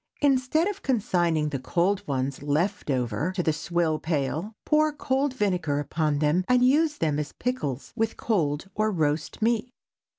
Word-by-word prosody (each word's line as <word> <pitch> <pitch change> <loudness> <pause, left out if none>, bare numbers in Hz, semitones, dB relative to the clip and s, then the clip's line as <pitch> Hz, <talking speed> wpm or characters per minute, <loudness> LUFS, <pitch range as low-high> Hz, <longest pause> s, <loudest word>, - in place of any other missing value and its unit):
Instead 275 +4 +3
of 405 -1 -4
consigning 175 - +1
the 140 -2 -3
cold 175 +9 0
ones 135 -1 -2
"left 155 +7 -1
over" 125 - 0
to 180 -2 -1
the 160 - +2
swill 160 0 0
pail, 160 +6 -2
pour 305 0 +3
cold 280 -1 0
vinegar 180 - 0
upon 150 +1 0
them 150 +5 +2
and 250 0 +5
use 300 +3 +3
as 150 -2 -1
pickles 150 - -3
with 225 -1 -1
cold 160 -7 0
or 215 +2 +1
roast 155 +2 -1
meat. 235 +1 +1
175 Hz, 155 wpm, -26 LUFS, 150-245 Hz, -, and